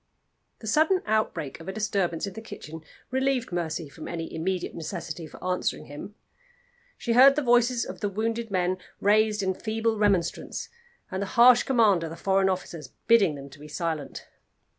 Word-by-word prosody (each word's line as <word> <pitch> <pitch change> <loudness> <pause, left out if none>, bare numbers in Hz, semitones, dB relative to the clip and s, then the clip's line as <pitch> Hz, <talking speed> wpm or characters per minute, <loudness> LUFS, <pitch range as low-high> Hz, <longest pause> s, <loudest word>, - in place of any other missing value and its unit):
The - - -9
sudden 315 - +3
outbreak 215 -10 -1
of 165 - -11
a - - -2
disturbance 195 -5 -1
in 200 - -6
the 220 - -8
kitchen 160 -7 -9 0.3
relieved 265 -3 0
Mercy 170 -2 -2
from 145 +3 -10
any 165 -1 -5
immediate 180 +3 -2
necessity 165 0 -6
for - - -13
answering 180 0 -1
him. 150 +8 -9 0.8
She 235 - -1
heard 270 +3 +8
the 300 - 0
voices 245 -1 +3
of - - -8
the 205 - -1
wounded 225 +3 -2
men 185 -1 0 0.2
raised 210 0 +3
in 190 0 +1
feeble 220 +2 -1
remonstrance, 195 -5 0 0.4
and 190 +1 -3
the 200 - -2
harsh 245 +1 +8
command 220 -9 +3
of 165 - -4
the 165 - -7
foreign 190 +2 +2
officers 175 -5 -4 0.2
bidding 205 -9 +5
them 140 0 -9
be 150 - -10
silent. 155 -2 -4
195 Hz, 170 wpm, -26 LUFS, 170-225 Hz, 0.8 s, heard